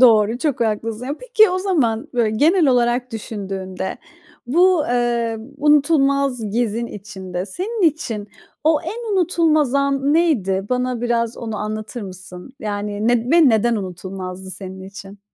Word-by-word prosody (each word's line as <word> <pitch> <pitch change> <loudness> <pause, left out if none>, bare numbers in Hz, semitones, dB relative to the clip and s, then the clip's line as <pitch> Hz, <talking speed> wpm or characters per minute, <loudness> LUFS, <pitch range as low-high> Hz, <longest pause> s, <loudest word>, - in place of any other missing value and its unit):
Doğru, 225 -2 +5
çok 280 -4 -1
haklısın. 225 +2 -1
Ya, 285 - -2
peki 450 -5 +4
o 370 - 0
zaman, 280 - 0
böyle, 230 -3 +2
genel 325 - +4
olarak 245 0 +1
düşündüğünde 195 -4 -5 0.5
bu, 345 +3 +4
eee, 235 -2 0 0.2
unutulmaz 280 -5 +2
gezin 235 +1 -1
içinde 190 -3 -6
senin 400 - -4
için 225 -9 -5 0.4
o 310 -1 +4
en 455 -1 -4
unutulmaz 320 -6 +2
an 275 0 +1
neydi? 205 - +1
Bana 250 -1 0
biraz 235 -1 0
onu 220 -2 -5
anlatır 215 +3 -5
mısın? 185 +3 -10
Yani, 205 +1 -2
ned 245 +3 +1
ve 330 -5 +7
neden 230 +1 +2
unutulmazdı 185 0 -6
senin 190 0 -8
için? 195 +1 -11
235 Hz, 135 wpm, -20 LUFS, 205-285 Hz, 0.5 s, ve